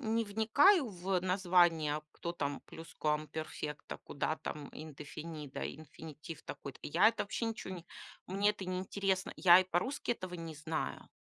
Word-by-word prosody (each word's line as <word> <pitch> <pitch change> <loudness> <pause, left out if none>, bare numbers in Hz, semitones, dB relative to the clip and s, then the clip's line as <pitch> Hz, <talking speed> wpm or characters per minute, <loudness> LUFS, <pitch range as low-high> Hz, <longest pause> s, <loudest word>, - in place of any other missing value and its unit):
не 230 0 +2
вникаю 235 - +5
в 185 -1 -1
название, 175 -5 +3
кто 170 - -4
там 145 -4 -2
Pluscuamperfecto, 155 -1 -3
куда 155 +2 -1
там 150 -2 -6
Indefinido, 155 -1 -6
инфинитив 155 +1 -8
такой-то. 140 -1 -7
Я 170 +8 +5
это 225 0 +2
вообще 205 +3 -2
ниче, 225 -3 -4
не 175 -2 -7 0.4
Мне 200 +2 +3
это 205 -2 -3
не 185 0 -1
интересно. 190 0 0
Я 175 -1 +9
и - - +3
по-русски 185 +10 0
этого 185 -6 -4
не 165 -2 -6
знаю. 155 +1 -3
175 Hz, 145 wpm, -34 LUFS, 155-195 Hz, 0.4 s, Я